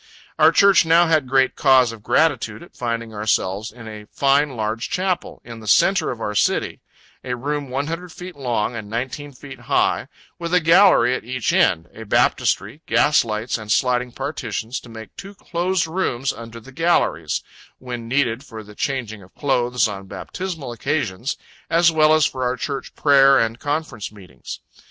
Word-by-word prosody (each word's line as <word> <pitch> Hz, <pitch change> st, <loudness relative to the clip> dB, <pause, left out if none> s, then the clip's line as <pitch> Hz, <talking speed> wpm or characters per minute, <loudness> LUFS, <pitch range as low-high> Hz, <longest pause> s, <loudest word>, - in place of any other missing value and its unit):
Our -, -, +7 dB
Church 200 Hz, -3 st, +5 dB
now 165 Hz, +1 st, +5 dB
had 155 Hz, -5 st, +2 dB
great 130 Hz, 0 st, +3 dB
cause 130 Hz, -4 st, +4 dB
of 115 Hz, -2 st, -11 dB
gratitude 115 Hz, -5 st, +1 dB
at -, -, -17 dB
finding 115 Hz, -2 st, -3 dB
ourselves 105 Hz, 0 st, -1 dB
in 115 Hz, 0 st, -12 dB
a 105 Hz, -1 st, -9 dB
fine 140 Hz, 0 st, +2 dB
large 110 Hz, +2 st, -2 dB
Chapel, 185 Hz, -1 st, -2 dB
in 115 Hz, -1 st, -9 dB
the 110 Hz, -, -11 dB
centre 195 Hz, -, +3 dB
of 120 Hz, -, -5 dB
our 105 Hz, -2 st, -3 dB
city -, -, 0 dB, 0.4 s
a 125 Hz, -1 st, -3 dB
room 145 Hz, +2 st, -3 dB
100 165 Hz, +7 st, -4 dB
feet 180 Hz, +2 st, -9 dB
long, 120 Hz, -4 st, -2 dB
and 110 Hz, -3 st, -7 dB
19 130 Hz, +5 st, -4 dB
feet 135 Hz, 0 st, -11 dB
high, 120 Hz, -, 0 dB, 0.3 s
with 170 Hz, +1 st, -1 dB
a -, -, +6 dB
gallery 165 Hz, -7 st, +5 dB
at -, -, -3 dB
each 125 Hz, +1 st, -2 dB
end, 80 Hz, +1 st, +2 dB
a 110 Hz, -, -9 dB
baptistery, 105 Hz, -, +1 dB
gas 120 Hz, +7 st, +4 dB
lights, 110 Hz, +1 st, -3 dB
and 105 Hz, -1 st, -6 dB
sliding 125 Hz, 0 st, +1 dB
partitions, 120 Hz, -4 st, -4 dB
to 120 Hz, -, -15 dB
make 110 Hz, -1 st, -11 dB
two 195 Hz, +1 st, -9 dB
closed 180 Hz, 0 st, -1 dB
rooms 150 Hz, -7 st, -1 dB
under 115 Hz, 0 st, -10 dB
the 125 Hz, +4 st, -14 dB
galleries, 130 Hz, -, 0 dB, 0.3 s
when 120 Hz, -2 st, -7 dB
needed 125 Hz, -1 st, 0 dB
for 110 Hz, -6 st, -10 dB
the 105 Hz, 0 st, -14 dB
changing 115 Hz, -4 st, -3 dB
of 90 Hz, 0 st, -18 dB
clothes 125 Hz, -4 st, +1 dB
on 95 Hz, -2 st, -7 dB
baptismal 150 Hz, -, -6 dB
occasions, 120 Hz, -2 st, -2 dB, 0.3 s
as 170 Hz, 0 st, +4 dB
well 155 Hz, -1 st, +4 dB
as 155 Hz, -1 st, +4 dB
for 130 Hz, -, -3 dB
our 125 Hz, 0 st, -1 dB
Church 140 Hz, 0 st, -5 dB
prayer 140 Hz, -2 st, +5 dB
and 115 Hz, -1 st, 0 dB
conference 145 Hz, -8 st, -3 dB
meetings. 95 Hz, -, -10 dB
125 Hz, 175 wpm, -21 LUFS, 115-150 Hz, 0.4 s, Our